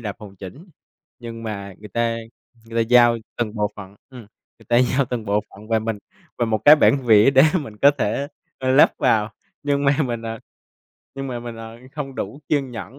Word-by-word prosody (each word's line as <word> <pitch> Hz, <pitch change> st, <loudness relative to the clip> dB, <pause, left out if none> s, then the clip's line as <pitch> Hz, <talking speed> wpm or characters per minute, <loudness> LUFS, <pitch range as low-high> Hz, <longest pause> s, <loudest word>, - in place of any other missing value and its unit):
đạp 105 Hz, -4 st, -5 dB
hoàn 105 Hz, -3 st, -12 dB
chỉnh, 100 Hz, -, -11 dB, 0.5 s
nhưng 115 Hz, -2 st, -8 dB
mà 100 Hz, -3 st, -6 dB
người 105 Hz, -, -10 dB
ta 115 Hz, +2 st, -1 dB, 0.5 s
người 115 Hz, 0 st, 0 dB
ta -, -, -14 dB
giao 120 Hz, -1 st, +6 dB, 0.2 s
từng 115 Hz, -2 st, -2 dB
bộ 105 Hz, -1 st, -1 dB
phận, 100 Hz, -1 st, -11 dB
ừm, 125 Hz, -2 st, -10 dB, 0.4 s
người -, -, -20 dB
ta 120 Hz, -, +3 dB
giao 130 Hz, +2 st, +2 dB
từng 120 Hz, -3 st, -4 dB
bộ 105 Hz, +1 st, +1 dB
phận 105 Hz, +2 st, -14 dB
và 115 Hz, -1 st, +2 dB
mình 110 Hz, -1 st, -3 dB, 0.4 s
và 120 Hz, -, +2 dB
một 110 Hz, -1 st, 0 dB
cái 150 Hz, +1 st, +9 dB
bản 135 Hz, -3 st, +3 dB
vẽ 110 Hz, +3 st, +6 dB
để 135 Hz, 0 st, +6 dB, 0.2 s
mình 110 Hz, -8 st, -9 dB
có 140 Hz, -, +6 dB
thể, 135 Hz, +7 st, -1 dB, 0.3 s
ơ, 130 Hz, 0 st, -1 dB
lắp 140 Hz, -, +6 dB
vào. 110 Hz, 0 st, +1 dB, 0.3 s
Nhưng 140 Hz, 0 st, 0 dB
mà 140 Hz, 0 st, +3 dB
mình 120 Hz, -2 st, -4 dB
ờ, 115 Hz, 0 st, -5 dB, 0.8 s
nhưng 135 Hz, 0 st, -5 dB
mà 120 Hz, -2 st, -4 dB
mình 120 Hz, -1 st, -8 dB
ờ, 115 Hz, +1 st, -10 dB, 0.2 s
hông 135 Hz, -3 st, -5 dB
đủ 140 Hz, +2 st, -6 dB
kiên 140 Hz, -4 st, 0 dB
nhẫn 125 Hz, +3 st, -9 dB
115 Hz, 215 wpm, -21 LUFS, 110-135 Hz, 0.8 s, cái